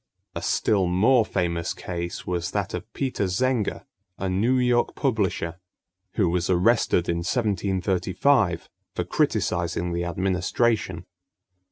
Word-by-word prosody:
A -, -, -4 dB
still 100 Hz, -4 st, +1 dB
more 110 Hz, +8 st, +4 dB
famous 85 Hz, -5 st, -2 dB
case 85 Hz, -1 st, -5 dB
was 90 Hz, -1 st, -2 dB
that -, -, -2 dB
of -, -, -6 dB
Peter 130 Hz, -6 st, -1 dB
Zenger, 115 Hz, +4 st, 0 dB, 0.3 s
a 95 Hz, -, -3 dB
New 110 Hz, +8 st, +2 dB
York 125 Hz, -1 st, +2 dB
publisher, 95 Hz, -, -1 dB, 0.5 s
who 100 Hz, -5 st, +2 dB
was 90 Hz, +1 st, 0 dB
arrested 90 Hz, -1 st, +3 dB
in 85 Hz, -, 0 dB
1735 95 Hz, +1 st, +1 dB, 0.3 s
for -, -, 0 dB
criticising 85 Hz, 0 st, 0 dB
the 85 Hz, 0 st, -1 dB
administration. 95 Hz, +1 st, 0 dB
95 Hz, 120 wpm, -25 LUFS, 85-115 Hz, 0.5 s, more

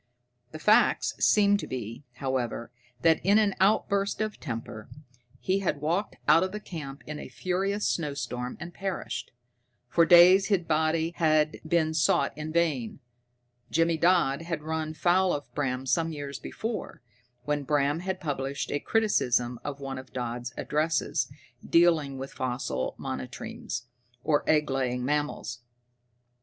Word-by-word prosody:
The 155 Hz, -, -7 dB
facts 210 Hz, +7 st, +3 dB
seemed 205 Hz, -1 st, +5 dB
to -, -, -5 dB
be, 115 Hz, +1 st, -6 dB
however, 125 Hz, -3 st, -3 dB, 0.3 s
that 165 Hz, -1 st, +4 dB
in 200 Hz, +4 st, +5 dB
an 210 Hz, -2 st, +3 dB
outburst 200 Hz, 0 st, +2 dB
of 215 Hz, -1 st, -2 dB
temper 115 Hz, -5 st, -6 dB, 0.5 s
he 190 Hz, +1 st, 0 dB
had 175 Hz, -7 st, -1 dB
walked 170 Hz, +8 st, -1 dB
out 165 Hz, -, +7 dB
of 205 Hz, +3 st, -4 dB
camp 145 Hz, -5 st, -7 dB
in 150 Hz, 0 st, -6 dB
a -, -, -8 dB
furious 195 Hz, +3 st, -1 dB
snowstorm 140 Hz, -5 st, -3 dB
and 175 Hz, 0 st, -7 dB
perished. 195 Hz, -2 st, -4 dB, 0.6 s
For 165 Hz, +4 st, +4 dB
days 180 Hz, +3 st, +8 dB
his 195 Hz, -4 st, +2 dB
body 160 Hz, +1 st, +1 dB
had 155 Hz, -1 st, +2 dB
been 160 Hz, -1 st, +2 dB
sought 155 Hz, -, +2 dB
in 155 Hz, +1 st, -5 dB
vain. 155 Hz, -9 st, 0 dB, 0.7 s
Jimmy 165 Hz, +1 st, +2 dB
Dodd 165 Hz, -4 st, +3 dB
had 165 Hz, -2 st, -4 dB
run 160 Hz, 0 st, -3 dB
foul 180 Hz, +3 st, +3 dB
of 145 Hz, -, -5 dB
Bram 130 Hz, -2 st, -2 dB
some 160 Hz, +6 st, +1 dB
years 145 Hz, -3 st, -6 dB
before, 220 Hz, -, -5 dB, 0.4 s
when 150 Hz, +1 st, 0 dB
Bram 145 Hz, +2 st, +1 dB
had 190 Hz, +1 st, -3 dB
published 140 Hz, -3 st, -3 dB
a 145 Hz, -, 0 dB
criticism 125 Hz, -, +1 dB
of 140 Hz, -1 st, -5 dB
one 135 Hz, -1 st, -5 dB
of 130 Hz, -, -12 dB
Dodd's 120 Hz, -1 st, -4 dB
addresses 155 Hz, +1 st, 0 dB, 0.3 s
dealing 165 Hz, -5 st, +3 dB
with 135 Hz, +1 st, -7 dB
fossil 125 Hz, -, -3 dB
monotremes, -, -, -5 dB, 0.4 s
or 150 Hz, -2 st, +2 dB
egg 150 Hz, -1 st, +4 dB
laying 125 Hz, -2 st, -1 dB
mammals. 145 Hz, -4 st, -2 dB
155 Hz, 140 wpm, -28 LUFS, 135-175 Hz, 0.7 s, days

